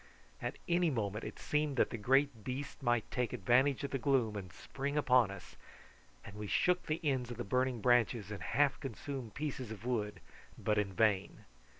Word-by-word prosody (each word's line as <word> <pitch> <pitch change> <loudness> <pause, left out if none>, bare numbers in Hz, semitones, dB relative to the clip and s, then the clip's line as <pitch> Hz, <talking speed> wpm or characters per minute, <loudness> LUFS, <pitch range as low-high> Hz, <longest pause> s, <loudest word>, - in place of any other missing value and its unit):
At - - -3
any 175 0 +3
moment 110 -5 -2
it - - -6
seemed 150 -2 -1
that - - +3
the - - -3
great 130 0 +2
beast 135 +5 -5
might 120 -3 +1
take 125 -3 -1
advantage 130 +7 +3
of 140 - -3
the 135 - -1
gloom 125 -5 +2
and 95 -4 -6
spring 140 - -4
upon 125 -6 +4
us, 100 -2 -10 0.7
and 100 - -10
we 105 0 -5
shook 180 - +2
the 155 0 0
ends 130 -5 0
of 120 - -6
the 120 - -3
burning 125 +2 0
branches 120 -3 +3
and 100 -4 -5
half 135 - +2
consumed 130 -3 -6
pieces 140 -5 -4
of 110 +1 -8
wood, 105 -5 -1 0.4
but 105 -1 +1
in 100 -2 -1
vain. 100 0 +1
125 Hz, 190 wpm, -34 LUFS, 105-140 Hz, 0.7 s, upon